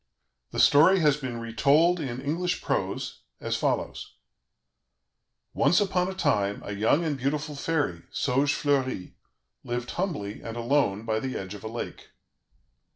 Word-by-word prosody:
The - - -4
story 160 +7 +6
has 150 -2 +4
been 130 -5 -5
retold 140 +10 +3
in 130 -5 -4
English 170 +6 -2
prose - - -2 0.2
as - - -2
follows: - - -2 1.4
"Once - - +4
upon 190 -3 +1
a 190 - -4
time 105 - 0
a 100 - -4
young 110 +11 +2
and 155 -2 0
beautiful 145 +3 -2
fairy, 140 - -1
Saugefleurie, 135 -4 0 0.5
lived 120 0 -3
humbly 150 - -3
and 115 +1 -6
alone 115 -4 +1
by 110 -1 0
the 130 +2 -3
edge 95 +1 -6
of 105 - -10
a - - -4
lake. 115 +2 -6
135 Hz, 140 wpm, -27 LUFS, 115-155 Hz, 1.4 s, story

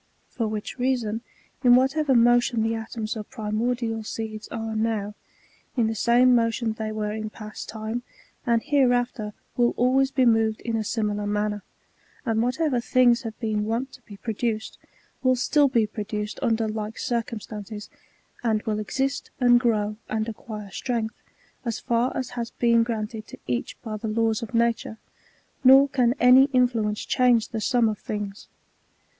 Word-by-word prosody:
For 230 - -2
which 215 +4 -5
reason, 240 -4 0 0.4
in 245 -1 +7
whatever 270 +2 +3
motion 240 0 +4
the 225 0 0
atoms 225 0 -4
of 215 -2 -7
primordial 225 +1 -2
seeds 215 0 -5
are 225 -1 -4
now, 215 -2 -1 0.6
in 235 - +3
the 220 - 0
same 245 +3 +4
motion 230 -1 +1
they 220 0 -4
were 215 -1 -2
in 215 0 -4
past 215 0 -9
time, 220 +2 -4 0.4
and 235 -1 +1
hereafter 245 -6 +1 0.2
will 240 -1 +2
always 265 +2 +3
be 265 -2 +2
moved 225 -2 +3
in 230 -1 -2
a 220 - 0
similar 210 -2 -1
manner; 210 0 -1 0.6
and 225 -2 +1
whatever 255 +2 +1
things 245 0 +4
have 225 -3 -7
been 215 -2 -1
wont 235 +5 -2
to - - -13
be 205 -3 -12
produced, 220 0 -3 0.4
will 255 -1 +3
stiU 280 +2 +3
be 230 -4 +3
produced 210 0 -5
under 225 -3 +1
like 215 0 -4
circumstances, 215 -3 -4 0.6
and 220 -2 +1
will 215 -2 -1
exist, 270 +6 -2
and 245 -1 +6
grow, 215 -3 0
and 220 0 -1
acquire 215 -2 -7
strength, 230 -2 -3 0.4
as 235 -3 -2
far 235 +2 +1
as 260 - -3
has 235 -1 -4
been 235 -1 +3
granted 220 -1 -3
to - - -10
each 120 -1 -3
by 215 -3 -4
the 220 - -5
laws 225 +1 +1
of 230 +1 -6
nature; 230 -1 +1 0.7
nor 270 +2 +8
can 255 -2 +2
any 255 +2 +7
influence 240 -6 +1
change 245 -3 +3
the 225 -2 -4
sum 240 +1 +3
of 215 -1 -2
things. 205 -1 -5
225 Hz, 160 wpm, -25 LUFS, 215-245 Hz, 0.7 s, nor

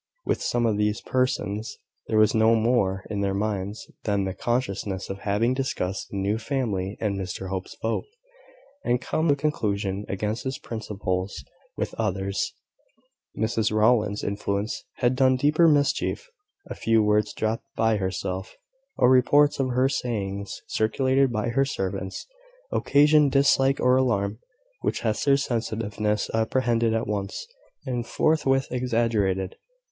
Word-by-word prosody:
With - - 0
some 120 -1 +1
of 110 -3 +1
these 105 0 +1
persons, 125 -3 -1 0.3
there 110 - +1
was 110 -1 +5
no 110 +1 +4
more 110 -4 +1
in 100 -1 -1
their 100 -1 0
minds 100 0 -2 0.2
than 100 -2 +1
the 95 -1 -2
consciousness 100 -4 -2
of 95 - -6
having 105 +5 +1
discussed 115 -8 -2
the 100 - -5
new 100 +3 0
family 105 -7 -2
and 105 -3 -1
Mr 95 0 -5
Hope's 95 -1 -5
vote, 115 0 -1 0.8
and 120 0 +1
come 155 +5 -1
to 145 - +4
a - - -18
conclusion 105 -9 -1
against 105 +3 -2
his 130 0 -3
"principles." 100 -4 -4 0.3
With - - -2
others, 100 -2 -1 0.8
Mrs 110 -1 0
Rowland's 110 -1 +2
influence 100 +1 -2
had 125 +1 +1
done 130 0 +4
deeper 150 +6 +4
mischief. 145 - +1 0.4
A - - -5
few 115 -1 +2
words 105 0 +2
dropped 110 +1 -2
by 110 -1 +2
herself, 95 0 -3 0.4
or 125 - +5
reports 140 +4 +4
of 130 -1 +1
her 130 +1 +2
sayings, 100 -7 -3
circulated 130 +4 +1
by 110 +1 -1
her 135 +4 +2
servants, 95 -7 -3 0.5
occasioned 150 0 +4
dislike 135 -1 +4
or 125 0 +4
alarm 110 -5 0 0.4
which - - -1
Hester's 140 +5 +2
sensitiveness 110 -3 -1
apprehended 115 0 +1
at 115 - 0
once, 100 - -3 0.4
and 125 -3 -2
forthwith 135 -3 +2
exaggerated. 115 -7 0
110 Hz, 140 wpm, -25 LUFS, 100-130 Hz, 0.8 s, was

